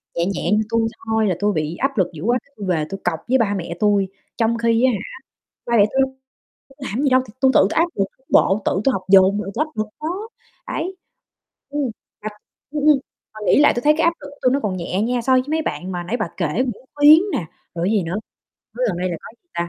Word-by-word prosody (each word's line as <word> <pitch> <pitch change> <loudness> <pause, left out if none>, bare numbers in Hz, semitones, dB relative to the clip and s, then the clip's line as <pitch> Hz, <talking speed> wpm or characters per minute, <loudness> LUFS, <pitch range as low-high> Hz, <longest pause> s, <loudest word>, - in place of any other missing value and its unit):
nhẹ 170 - +1
nhẹ 195 +1 -2
như 215 +1 +3
tui 230 0 +1 0.2
thôi 220 -1 +1
là 180 - +1
tui 205 0 +1
bị 155 +1 -2
áp 270 +1 -1
lực 185 -2 +3
dữ 155 - -8
quá 240 +3 +2 0.2
tui 205 - -6
về 160 -4 +1
tui 195 0 -5
cọc 170 -3 0
với 260 +2 +4
ba 210 -4 +1
mẹ 170 -2 -5
tui, 205 -2 +3 0.3
trong 230 0 +1
khi 230 +1 +2
á 260 - +4
hả, 205 - -2 0.7
ba 235 -1 +2
mẹ 205 - +7
tui 270 - 0
đâu 265 0 0 0.6
làm 265 -7 -5
cái 275 - 0
gì 285 - +3
đâu 255 0 +5
thì 210 - -14
tui 265 -1 +5
tự - - +7
tui 195 - +1
áp 335 +2 +4
lực 195 - +1 0.2
bộ, 195 +2 +3
tự 190 - +1
tôi 270 - +4
học 190 - -2
dồn 195 +1 +6
mà 210 - -3
tui 305 - +1
áp 310 - -14
lực 215 - 0
đó, 370 +8 -4 0.4
đấy. 370 +3 -3 0.7
Ừm, 285 -4 -1 0.3
mà 215 - -3 0.4
ừm, 300 0 -3
ừm, 295 -3 +6 0.4
mà 215 - -10
nghĩ - - +5
lại 295 - +5
tui 240 - -1
thấy 300 +1 +5
cái 325 - +3
áp 335 - +4
lực 285 - -9
của 285 - -16
tôi 255 0 +3
nó 280 - +1
còn 195 -4 -2
nhẹ 185 +3 -2
nha, 240 +1 0
so 260 - +2
với 255 0 +5
mấy 320 0 +1
bạn 185 -8 -4
mà 175 -1 -3
nãy 225 +8 -2
bà 215 -7 -2
kể 175 - 0
Nguyễn 255 0 -2
Khuyến 295 +2 +8
nè, 165 - -2 0.3
rồi 170 +1 -1
cái 210 - +1
gì 195 - +2
nữa, 170 +2 -4 0.6
mới 250 0 +1
gần 180 - -2
đây 185 0 -1
là 170 - -3
có - - -11
gì 350 - -50
ta? 170 0 -2
220 Hz, 270 wpm, -21 LUFS, 190-265 Hz, 0.7 s, Khuyến